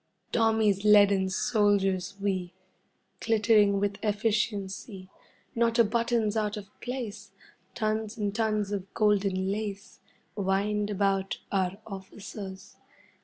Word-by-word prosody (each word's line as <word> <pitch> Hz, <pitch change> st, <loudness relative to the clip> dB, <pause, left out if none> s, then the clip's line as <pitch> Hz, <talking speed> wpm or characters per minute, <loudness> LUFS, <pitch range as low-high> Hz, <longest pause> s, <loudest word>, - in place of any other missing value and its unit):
Tommy's 220 Hz, -3 st, +2 dB
leaden 200 Hz, -2 st, +5 dB
soldiers 195 Hz, -2 st, +1 dB
we, 185 Hz, -3 st, -2 dB, 0.6 s
Glittering 210 Hz, -3 st, +3 dB
with 200 Hz, 0 st, -1 dB
efficiency. 205 Hz, -2 st, -2 dB, 0.4 s
Not 230 Hz, 0 st, +1 dB
a 235 Hz, -, +7 dB
button's 230 Hz, 0 st, 0 dB
out 210 Hz, -1 st, -1 dB
of 200 Hz, -1 st, -8 dB
place, 245 Hz, -4 st, -5 dB, 0.5 s
Tons 220 Hz, -1 st, -2 dB
and 205 Hz, -2 st, -1 dB
tons 215 Hz, -2 st, 0 dB
of 195 Hz, -2 st, -4 dB
golden 195 Hz, -3 st, +2 dB
lace 205 Hz, -1 st, -5 dB, 0.4 s
Wind 205 Hz, +1 st, 0 dB
about 195 Hz, -1 st, 0 dB
our 190 Hz, -1 st, 0 dB
officers. 195 Hz, 0 st, -9 dB
205 Hz, 105 wpm, -28 LUFS, 195-220 Hz, 0.6 s, a